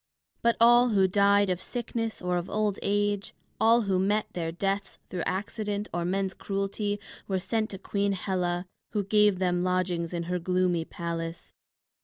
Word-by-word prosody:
But 235 0 +3
all 240 +1 +7
who 195 -4 +4
died 200 0 +4
of 180 0 -2
sickness 230 -3 -4
or 180 0 +1
of 175 +1 -3
old 210 -2 0
age, 205 0 0 0.2
all 230 +2 +5
who 190 -2 +1
met 205 +3 +2
their 165 -2 -2
deaths 195 +3 -2
through 180 - -2
accident 205 +2 -2
or 175 0 -1
men's 190 +1 0
cruelty, 200 +1 -2 0.3
were 190 - 0
sent 215 +4 -1
to 195 - -6
Queen 200 +1 -1
Hela, 180 -2 -1 0.3
who 210 -2 +1
gave 210 -1 +4
them 180 -1 +1
lodgings 180 -2 0
in 170 -1 -2
her 180 +1 -2
gloomy 180 -1 +1
palace. 165 -1 -5
195 Hz, 165 wpm, -28 LUFS, 180-205 Hz, 0.3 s, all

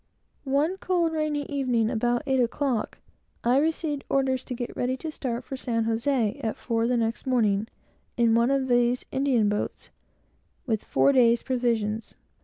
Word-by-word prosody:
One 300 +7 +1
cold, 350 -4 0
rainy 305 -2 -1
evening, 250 -6 0
about 240 +1 0
eight 265 -1 +1
o'clock, 245 -1 -1 0.5
I 245 +2 +3
received 310 -2 -1
orders 265 -2 +1
to 250 - -5
get 240 0 -5
ready 255 +1 -1
to 315 +4 -5
start 250 -4 -4
for 270 - -6
San 230 -3 -1
José 230 +1 0
at 220 - -2
four 230 -1 -1
the 245 0 +1
next 230 +2 -2
morning, 220 -5 +2 0.5
in 235 -2 +4
one 235 +2 +3
of 275 -1 +1
these 245 0 +2
Indian 265 -6 +2
boats, 205 0 -3 0.7
with 220 -5 -1
four 280 - +3
days' 240 -3 +4
provisions. 230 -4 -1
245 Hz, 160 wpm, -26 LUFS, 230-275 Hz, 0.7 s, in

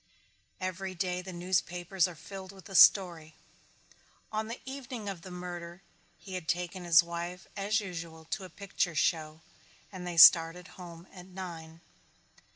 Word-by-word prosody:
Every 185 +1 -4
day 180 0 -2
the 185 +1 -8
newspapers 180 0 0
are 175 - -9
filled 190 +4 -9
with 190 -1 -15
the 195 - -10
story. 170 -4 +5 1.0
On 220 0 -2
the 230 +2 -6
evening 260 -5 -7
of 195 -4 -5
the 185 - -10
murder 175 0 -7 0.3
he 190 - -11
had 180 -3 -5
taken 180 +1 -2
his 170 0 +7
wife 170 +1 -6
as 210 +2 +1
usual 165 -5 -7
to 195 - -2
a 185 - -9
picture 195 -2 -2
show 155 0 0 0.5
and 180 -2 -7
they 175 -1 -5
started 165 +2 +7
home 170 -1 -11
at 180 -1 -11
nine. 170 -3 -9
180 Hz, 155 wpm, -30 LUFS, 170-190 Hz, 1.0 s, his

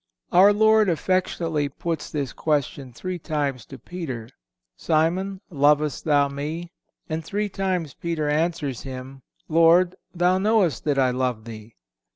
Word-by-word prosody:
Our 190 +3 +7
Savior 220 +1 +5
affectionately 165 -4 -1
puts 160 +2 -4
this 140 -4 -3
question 140 -3 -1
three 180 +9 -5
times 145 -7 -2
to 135 - -10
Peter: 130 -7 -6 0.5
"Simon, 180 +5 0
lovest 150 -1 +2
thou 145 -2 +4
Me?" 155 +5 -5 0.4
And 160 +1 -3
three 205 +5 -2
times 185 -7 -2
Peter 165 -3 -3
answers 150 -4 -1
Him, 130 0 -8 0.3
"Lord, 165 +3 +4 0.2
Thou 180 +1 +2
knowest 205 -5 +2
that 145 -2 +1
I 130 -2 +3
love 125 -3 -2
Thee." 110 -1 -10
155 Hz, 135 wpm, -24 LUFS, 140-180 Hz, 0.5 s, Our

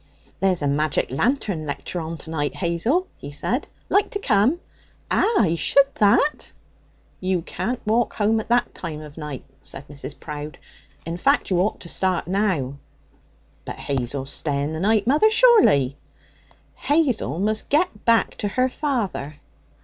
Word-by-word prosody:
'There's 185 -5 +1
a - - +2
magic 150 0 0
lantern 195 - 0
lecture 145 +5 -4
on 165 +1 -5
tonight, 160 -2 -3
Hazel,' 195 - 0
he 140 - -8
said. 220 - -2 0.2
'Like 405 - +2
to 405 - -4
come?' 250 - +2 0.5
'Ah! 460 - +2
I 165 -4 +2
should 275 - +3
that.' 215 +8 +2 0.7
'You 185 -2 -1
can't 245 +7 -4
walk 225 +2 +1
home 220 +1 +2
at 220 - -7
that 240 +1 +2
time 155 -3 -6
of 150 -1 -11
night,' 150 -4 -7 0.2
said 135 +2 -7
Mrs. 145 0 -9
Prowde. 150 0 -7 0.5
'In 165 +1 -4
fact, 275 +2 +2
you 180 - +3
ought 200 +4 0
to - - -7
start 185 +1 0
now.' 175 -9 0 0.8
'But - - -6
Hazel's 135 0 -3
staying 145 0 -1
the 160 - -4
night, 205 +2 +2
mother, 295 - +4
surely?' 435 - +5 0.8
'Hazel 275 - 0
must 215 +3 0
get 290 - +1
back 230 -1 +3
to 205 - -2
her 255 +6 +1
father.' 230 - -2
185 Hz, 150 wpm, -23 LUFS, 150-240 Hz, 0.8 s, surely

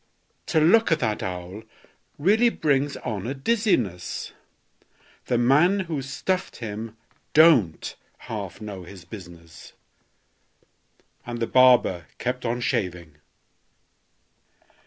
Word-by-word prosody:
To 160 - +2
look 190 +8 +4
at 165 - +4
that 110 -3 -1
owl 90 +3 -6 0.6
really 215 +10 +4
brings 145 -7 0
on 105 -2 -5
a 135 - -3
dizziness; 135 - -1 1.0
The 120 - +1
man 150 +11 +4
who 165 -6 -3
stuffed 185 +8 -3
him 110 0 -7 0.4
don't 145 - +4 0.3
half - - -6
know 105 -3 -7
his 90 0 -12
business!" 85 -4 -12 1.5
And 120 -1 -6
the 115 - 0
barber 120 - +4
kept 125 +1 -3
on 120 +1 -2
shaving. 85 -8 -3
120 Hz, 105 wpm, -24 LUFS, 95-150 Hz, 1.5 s, look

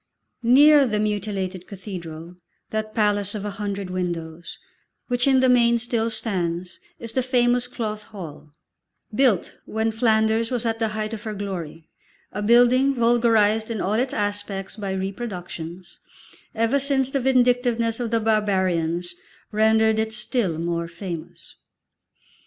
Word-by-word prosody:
Near 280 +4 +6
the 215 -2 0
mutilated 200 -3 -2
cathedral, 175 -4 -8 0.4
that 215 0 -3
palace 205 -1 +1
of 210 -1 -4
a 205 - -3
hundred 200 -2 -3
windows, 170 -2 -4 0.5
which 245 +1 +1
in 265 -1 +5
the 260 - +4
main 235 -1 +4
still 230 -1 -1
stands, 180 -6 -3 0.2
is 230 - -5
the 260 - +1
famous 245 -1 +2
Cloth 215 -4 -5
Hall, 165 -7 -10 0.6
built 235 -6 +1
when 220 +1 -1
Flanders 220 0 +2
was 245 -2 -2
at 225 0 -1
the 225 - +1
height 215 +1 -3
of 220 - -5
her 215 -1 -5
glory, 175 -6 -6 0.4
a 205 - -4
building 245 +5 +4
vulgarised 230 -2 +3
in 225 -2 -3
all 195 - 0
its 250 +4 +1
aspects 205 -2 -3
by 205 -3 -5
reproductions, 190 -3 -6 0.6
ever 230 +5 +2
since 270 -1 +1
the 275 - +1
vindictiveness 245 -3 +2
of 240 -2 -2
the 230 0 +1
barbarians 185 -6 0 0.4
rendered 220 0 +3
it 220 0 -1
still 215 - -1
more 170 0 -2
famous. 170 -1 -8
215 Hz, 140 wpm, -23 LUFS, 190-235 Hz, 0.6 s, Near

